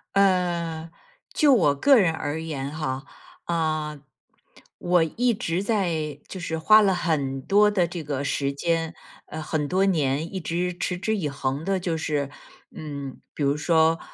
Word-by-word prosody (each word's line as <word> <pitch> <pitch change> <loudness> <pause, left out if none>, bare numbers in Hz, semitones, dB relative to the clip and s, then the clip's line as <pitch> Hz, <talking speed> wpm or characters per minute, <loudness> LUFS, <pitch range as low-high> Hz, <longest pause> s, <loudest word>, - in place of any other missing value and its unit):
呃， 175 -4 +1 0.4
就 295 -3 +5
我 155 - +4
个 275 - +5
人 180 -7 +3
而 160 0 -3
言 140 -4 -4
哈， 140 -3 -4 0.4
啊， 155 -3 -1 0.8
我 175 -1 +3
一 235 +10 +1
直 180 -2 -2
在 165 - -1
就 - - -7
是 165 -2 -3
花 215 +7 +6
了 195 -2 +3
很 140 -6 -1
多 210 +7 +4
的 185 -4 +2
这 170 -1 -6
个 140 -2 -3
时 140 -1 -1
间， 165 +3 -1 0.3
呃， 155 - -6
很 155 -1 -2
多 190 +2 +2
年， 155 -3 0
一 190 - -2
直 175 +2 -2
持 180 0 -2
之 220 +4 -1
以 170 -8 -2
恒 140 +1 -3
的 195 +1 0
就 175 -2 -2
是 150 -3 -1 0.5
嗯， 140 -3 -7
比 - - -8
如 140 0 +2
说 160 +1 +3
165 Hz, 175 characters per minute, -25 LUFS, 150-180 Hz, 0.8 s, 花